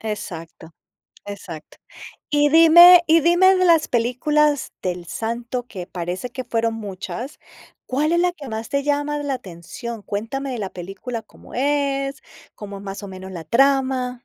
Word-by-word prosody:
Exacto, 165 -6 -7 0.5
exacto. 185 -6 -9 0.5
Y 295 0 +3
dime 340 +3 +9
y 330 +1 +5
dime 350 +4 +5
de 370 - +2
las 335 -3 +4
películas 285 +5 +1
de 185 - 0
El 175 -1 -10
Santo, 235 +6 -4
que 185 -7 -8
parece 180 +7 -5
que 255 +1 -6
fueron 230 -1 -1
muchas, 210 - -7 0.5
¿cuál 295 +5 0
es 345 - +3
la 355 0 +2
que 295 -6 -10
más 220 0 -5
te 280 0 -1
llama 290 0 0
la 285 -2 -2
atención? 210 +2 -8
Cuéntame 230 +8 -4
de 245 - -4
la 195 -3 -4
película, 195 +6 -6
¿cómo 215 - -17
es? 275 0 -1 0.3
¿Cómo 200 -1 -8
es - - -12
más 195 +1 -7
o 200 - -7
menos 190 0 -9
la 170 -3 -7
trama? 260 - +2
245 Hz, 165 wpm, -21 LUFS, 200-290 Hz, 0.5 s, dime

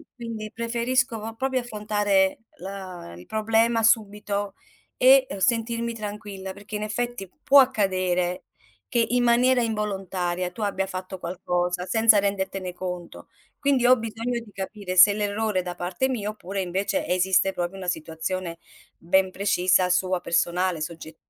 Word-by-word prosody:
quindi 225 -3 -6
preferisco 235 +1 0
po 225 +1 -7
proprio 260 +1 0
affrontare, 205 -4 +1 0.2
uhm, - - -13
la 185 - -8
il 90 - -12
problema 225 +1 +2
subito 205 -2 +1 0.4
e 260 +1 +6
sentirmi 230 +2 0
tranquilla, 205 -3 -6
perché 205 +2 -9
in 210 - -2
effetti 225 -3 -3
può 280 +1 +7
accadere 185 -7 +1 0.4
che, 235 -1 +2
in 245 0 +2
maniera 245 +1 +4
involontaria, 190 -5 -2
tu 215 - -9
abbia 195 -2 -1
fatto 185 0 -6
qualcosa 180 0 -2
senza 225 0 +5
rendertene 195 -2 -2
conto. 180 -1 -7 0.3
Quindi 275 -4 +2
ho 255 0 +7
bisogno 230 +2 -3
di 225 -3 -13
capire 195 -1 -5
se 205 +3 +9
l'errore 210 -1 -1
è - - -2
da 180 -1 -5
parte 180 +9 -1
mia 210 -5 -2
oppure 195 -2 -5
invece 185 +2 -1
esiste 185 +1 +2
proprio 175 +2 -3
una 185 -1 -7
situazione 165 +2 -4 0.4
ben 185 +2 +2
precisa 185 -2 +2
sua 185 0 +1
personale, 175 0 0
sogge 160 0 -7
200 Hz, 145 wpm, -25 LUFS, 185-225 Hz, 0.4 s, se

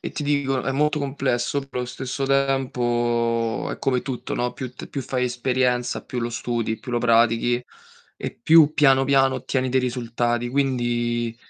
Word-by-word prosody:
E - - -5
ti 150 - -4
dico, 140 -2 0
molto 150 +2 +1
complesso, 135 -2 -1
però 135 -2 -6
allo 125 - -2
stesso 130 +2 -4
tempo 120 -4 0
è - - -7
come 130 -2 +1
tutto, 130 -2 -5
no, 125 0 -1
più 130 -2 -7
t 130 - -9
più 140 - -5
fai 125 0 -1
esperienza, 125 0 0
più 125 - -4
lo 120 0 -2
studi, 115 -1 -2
più 125 - -8
lo 120 - +2
pratichi 115 +1 +3 0.6
e - - -4
più 155 +3 +6
piano, 135 -3 +5
piano 135 -1 +3
ottieni 130 +1 -1
dei 130 +1 +2
risultati. 120 -1 -1
Quindi 120 -3 0
125 Hz, 165 wpm, -23 LUFS, 120-135 Hz, 0.6 s, più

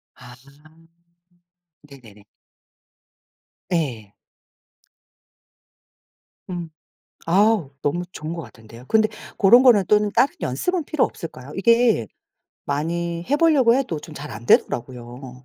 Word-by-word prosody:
아. 125 -1 -14 1.5
네네네. 120 -8 -16 1.5
네. 120 - -3 2.4
음. 175 -2 -5 0.6
아우 195 -2 +2
너무 175 +5 -1
좋은 155 +1 -6
것 165 - -6
같은데요. 115 -1 -14
근데 220 -1 +3 0.3
고런 235 +6 +6
거는 230 -7 +5
또는 210 0 +3
다른 275 - +3
연습은 335 - -2
필요 295 -1 +1
없을까요? 145 -5 -8
이게 230 - +3 0.6
많이 170 +4 -3
해 285 - +2
보려고 290 -7 +4
해도 250 - -1
좀 155 - -12
잘 150 0 -8
안 120 - -9
되더라고요. 125 +1 -1
165 Hz, 210 characters per minute, -22 LUFS, -, 2.4 s, 고런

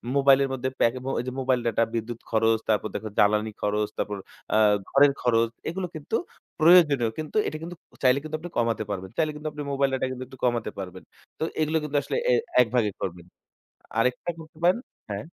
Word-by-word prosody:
মোবাইলের 140 0 +5
মধ্যে, 130 0 -2
যে, - - -39
প্যাকমো 130 +3 +1 0.3
mobile 130 -1 +1
data 115 - +2
বিদ্যুৎ 115 +1 -3
খরচ, 115 0 +3
তারপর 110 0 +2
দেখেন 110 -1 -4
জ্বালানি 105 +1 +3
খরচ, 105 0 0
তারপর 105 -1 -2 0.4
আ - - +5 0.3
ঘরের 140 0 +5
খরচ 115 -2 +3 0.2
এগুলো 180 +2 -3
কিন্তু 155 +8 -2 0.4
প্রয়োজনীয় 155 -8 +6
কিন্তু 155 +7 -4
এটা 155 - -3
কিন্তু 175 +1 -6 0.3
চাইলে 130 +2 +5
কিন্তু 155 0 -4
আপনি 175 +2 -7
কমাতে 115 -2 +1
পারবেন। 95 -2 -4
চাইলে 155 -2 +2
কিন্তু 150 +1 -6
আপনি 150 - -7
mobile 140 0 +1
data 130 - 0
কিন্তু 130 0 -5
একটু 130 -1 -13
কমাতে 120 -3 0
পারবেন। 95 -2 -7 0.4
তো - - -1 0.2
এগুলো 155 +1 +2
কিন্তু 150 -1 -1
আসলে - - -3
এ - - +5 0.3
একভাগ 125 0 +2 0.2
করবেন। 85 -2 -4 0.7
আরেকটা 125 +8 +1
করতে 160 0 -13
পারেন 180 +6 +5 0.3
হ্যাঁ। 100 +4 -4
125 Hz, 185 wpm, -26 LUFS, 110-150 Hz, 0.7 s, প্রয়োজনীয়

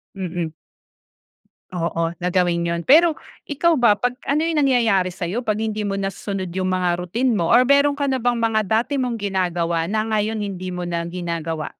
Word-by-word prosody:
Mm. 175 -3 -4 1.2
Oo 165 -1 -1
na 180 - -2
gawin 175 -1 +1
yun. 170 0 -1
Pero 320 +3 +5 0.3
ikaw 315 +1 +2
ba, 235 -4 +5
pag 245 +4 0 0.2
ano 300 +3 +1
yung 325 -2 0
nangyayari 230 -9 +3
sayo 185 +3 -3
pag 215 -4 -1
hindi 215 -1 -2
mo 195 - -2
nasusunod 195 -1 -4
yung 185 +1 -2
mga 180 -1 0
routine 235 +9 0
mo 175 -7 0
or 240 +6 +6
mayro'n 280 +2 +3
ka 280 -1 -1
na 260 - 0
bang 245 0 +1
mga 225 -2 +1
dati 235 +7 0
mong 250 -2 -1
ginagawa 175 -5 -1
na 215 +2 0
ngayon 220 0 -1
hindi 185 -2 -5
mo 180 -1 -4
na 170 -1 -3
ginagawa? 170 -3 -4
195 Hz, 185 wpm, -21 LUFS, 175-240 Hz, 1.2 s, or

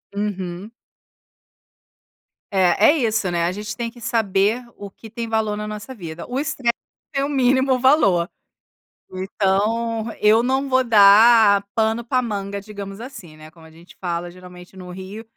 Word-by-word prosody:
Uhum. 195 -1 -4 1.8
É, 190 +1 +3
é 320 - 0
isso, 220 -7 0
né, 170 -1 -1
a 170 - 0
gente 210 +2 -6
tem 235 0 -4
que 240 - -16
saber 225 -1 0
o 200 - -8
que 220 +3 -14
tem 230 +2 -5
valor 220 -2 -1
na 210 0 -5
nossa 215 +4 -7
vida 170 -7 -8
o 250 +2 -2
estresse 270 -4 -1 0.4
é 275 - 0
o - - -4
mínimo 260 -1 +2
valor. 200 - +3 0.8
Então 215 +4 -1
eu 215 +2 +4
não 265 +2 0
vou 260 0 +3
dar 210 -1 +6
pano 225 +1 0
pra 255 +2 0
manga 200 -4 -4
digamos 200 -1 -9
assim, 215 - -11
né, 155 0 -13
como 165 0 -18
a - - -15
gente 165 +3 -18
fala 175 -1 -3
geralmente 180 0 -14
no 180 -1 -10
Rio 190 +4 -9
210 Hz, 160 wpm, -21 LUFS, 190-235 Hz, 1.8 s, dar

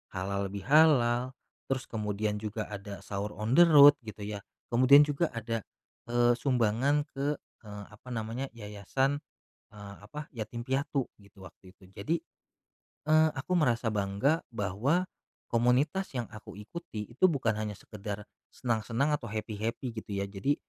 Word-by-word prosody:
halal 100 +1 -2
bihalal, 125 +2 +3 0.3
terus 130 -1 -1
kemudian 105 -1 -2
juga 105 0 -3
ada 100 -1 -7
sahur 100 +1 -3
on 110 +3 -1
the 175 - +7
road 145 -4 +9
gitu 105 -2 -8
ya 105 -1 -5 0.3
kemudian 140 +4 +7
juga 150 +3 0
ada, 115 -1 -3 0.5
eee, 120 0 +4
sumbangan 130 +3 +1
ke 140 +1 -1
eee, 105 -2 -12
apa 125 +4 -14
namanya 115 +3 -3
yayasan 115 +7 -1 0.5
eee, 100 -1 -10
apa 150 +7 -8
yatim 120 -1 -6
piatu 135 +1 -1
gitu 100 -1 -20
waktu 95 +2 -18
itu 95 -1 -19
jadi, 125 - -2 0.9
eee, 155 0 +6
aku 135 +7 -6
merasa 120 -5 +1
bangga 105 +10 +1 0.2
bahwa, 115 - +1 0.5
komunitas 130 +10 +2
yang 120 - -1
aku 110 -2 -10
ikuti 105 -2 -7
itu 185 +10 +4
bukan 130 -8 +1
hanya 105 -1 -3
sekedar, 105 0 -7 0.3
senang-senang 120 +4 0
atau 125 -5 -2
happy 110 +1 -4
happy 115 +3 -3
gitu 110 -3 -6
ya 100 0 -1
jadi, 100 +9 -1
115 Hz, 145 wpm, -30 LUFS, 105-135 Hz, 0.9 s, road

